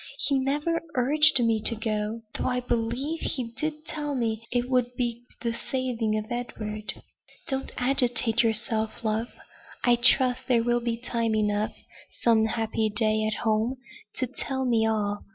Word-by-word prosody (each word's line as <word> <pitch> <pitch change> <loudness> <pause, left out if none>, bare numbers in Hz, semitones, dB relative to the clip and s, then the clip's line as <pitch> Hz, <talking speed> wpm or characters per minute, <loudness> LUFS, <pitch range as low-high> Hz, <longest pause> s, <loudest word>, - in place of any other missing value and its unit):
He 280 - +1
never 295 +5 0
urged 285 +3 +5
me 225 -1 +2
to 230 - +3
go; 215 0 -2
though, - - -2
I 250 -1 +1
believe, 245 +7 -1
he 240 -4 -2
did 305 +4 -3
tell 295 -3 -3
me 230 -2 -2
it 245 0 0
would 250 -1 +1
be 240 -1 -2 0.2
the 235 -1 0
saving 235 -3 -1
of 215 - -3
Edward." 215 -3 -5 0.4
"Don't 270 0 -2
agitate 245 -3 +2
yourself, 220 0 -1
love. 220 +1 0 0.6
I 245 -1 +5
trust 255 +1 +4
there 235 -3 +3
will 240 0 +1
be 235 -1 -1
time 230 -2 -1
enough, 210 0 0 0.3
some 225 -2 +3
happy 220 -1 0
day 215 0 +2
at 215 - -3
home, 220 +4 +1 0.4
to 260 - +1
tell 265 +1 -4
me 225 -3 +3
all. 205 -2 -1
235 Hz, 155 wpm, -27 LUFS, 220-255 Hz, 0.6 s, urged